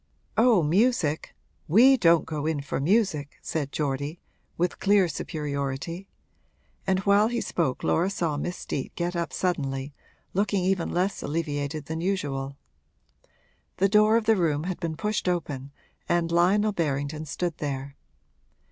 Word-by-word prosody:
'Oh, 225 -6 +5
music 170 -2 +1 0.3
we 240 - +7
don't 170 - +4
go 155 -1 -3
in 155 -3 0
for 140 - -3
music!' 160 -3 +1
said 145 -4 -3
Geordie, 145 +3 -2 0.4
with 175 +1 -1
clear 200 -2 +4
superiority; 150 +3 -4 0.8
and 190 -1 +3
while 200 +2 +4
he 240 +1 -1
spoke 155 - -1
Laura 175 +4 +2
saw 170 -6 -1
Miss 175 +5 -3
Steet 135 - -5
get 175 +1 -2
up 170 -1 -2
suddenly, 140 -6 -2 0.4
looking 195 -1 +1
even 185 -2 +1
less 185 +3 0
alleviated 145 -1 -3
than 160 +2 -4
usual. 140 -8 -2 1.2
The 195 +1 +3
door 215 +2 +5
of 230 - -1
the 225 0 +5
room 155 -5 +1
had 180 0 -3
been 165 -3 -3
pushed 210 -2 -1
open 145 -6 -3 0.4
and 170 -1 +1
Lionel 195 +5 +3
Berrington 150 -2 -2
stood 175 +1 -3
there. 140 -1 -4
170 Hz, 140 wpm, -26 LUFS, 145-195 Hz, 1.2 s, we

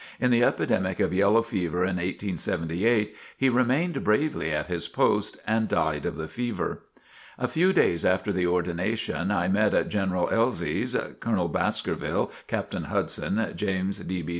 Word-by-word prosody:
In 125 -1 +2
the 120 0 +4
epidemic 95 -5 +1
of - - +1
yellow 100 +4 +4
fever 90 -6 -1
in 90 0 0
1878, 95 +3 0 0.2
he 135 - +3
remained 130 +8 +1
bravely 110 - +1
at 75 - -1
his 85 -2 -4
post 85 - +1
and 110 0 +1
died - - 0
of - - -3
the 80 - -4
fever. 120 +5 -3 0.6
A - - -1
few 180 +4 +3
days 85 - +2
after 95 +2 +1
the 90 -1 +1
ordination, 90 0 -1
I 90 -4 +1
met 105 +3 +3
at - - +1
General 95 -3 0
Elzy's, 115 +3 0 0.2
Colonel - - 0
Baskerville, - - -1 0.2
Captain - - -3
Hudson, 110 +1 -1
James 95 -1 -1
D. 90 -2 -4
B. 80 - -6
95 Hz, 155 wpm, -26 LUFS, 90-115 Hz, 0.6 s, the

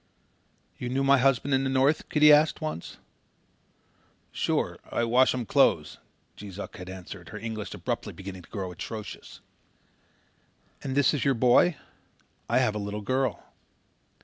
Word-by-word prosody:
"You 125 - -4
knew 135 +2 0
my 135 0 +5
husband 135 +1 +2
in 135 0 +2
the 135 - 0
North?" 135 +3 +2
Kitty 150 0 +6
asked, 150 +1 +4
once. 155 - -5 1.3
"Sure. - - -1
I - - 0
wash 125 +3 +3
um 125 -2 -3
clothes," - - +2 0.4
Jees 100 -3 -10
Uck 100 - -7
had 90 0 -8
answered, 95 -1 -9
her 105 - -7
English 110 -1 -5
abruptly - - -4
beginning 95 -1 -9
to 85 - -19
grow 95 -3 -5
atrocious. 105 +4 -8 1.4
"And 135 -1 -4
this 145 0 +4
is 145 - -1
your 135 -1 +2
boy? 125 +8 +4 0.7
I - - +3
have 110 - +2
a 105 - -3
little 105 +1 -4
girl." 130 +2 -1
120 Hz, 150 wpm, -27 LUFS, 100-135 Hz, 1.4 s, Kitty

